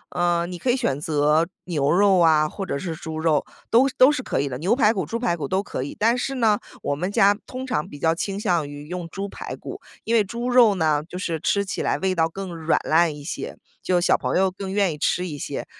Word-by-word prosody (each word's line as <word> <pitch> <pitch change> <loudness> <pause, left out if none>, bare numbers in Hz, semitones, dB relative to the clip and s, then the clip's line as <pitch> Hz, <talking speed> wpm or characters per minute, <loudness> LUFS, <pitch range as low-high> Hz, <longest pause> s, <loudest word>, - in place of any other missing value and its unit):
呃， 175 -1 +1
你 175 0 -7
可 260 - -2
以 245 - +4
选 145 - -1
择 150 +1 +2 0.2
牛 150 -5 0
肉 195 +1 +4
啊 155 -2 +4
或 195 - -6
者 180 -7 -3
是 170 +1 -4
猪 160 0 -7
肉， 160 -2 +2 0.3
都 255 +4 +5
都 260 +3 +7
是 255 - -2
可 - - -2
以 140 - 0
的， 130 -1 -5
牛 185 +8 +2
排 225 -4 +4
骨 - - -2
猪 230 - -3
排 230 -7 0
骨 150 -4 -4
都 190 +6 0
可 165 - -5
以。 140 - -6
但 230 +3 +3
是 270 +2 -2
呢， 220 -5 +2 0.2
我 145 - -1
们 180 +7 -3
家 200 0 +4
通 260 +1 -6
常 245 -12 -2
比 145 - -10
较 160 +2 +2
倾 195 +4 -3
向 175 -8 0
于 145 +1 -9
用 175 -1 -5
猪 195 +3 -5
排 - - -7
骨， - - -9 0.2
因 230 - -2
为 225 -2 +5
猪 235 +5 -5
肉 240 -5 +6
呢 155 -4 +1
就 180 - -6
是 165 -3 -3
吃 200 +4 0
起 190 - -4
来 - - 0
味 190 0 0
道 165 -2 +1
更 185 0 -7
软 160 0 +1
烂 160 -1 +2
一 145 - -10
些， 150 - -6 0.2
就 180 -1 +1
小 175 - +3
朋 - - -1
友 190 0 +2
更 190 0 -6
愿 195 -5 +1
意 - - -8
吃 180 +4 0
一 145 -3 -6
些。 - - -4
180 Hz, 275 characters per minute, -23 LUFS, 160-205 Hz, 0.3 s, 都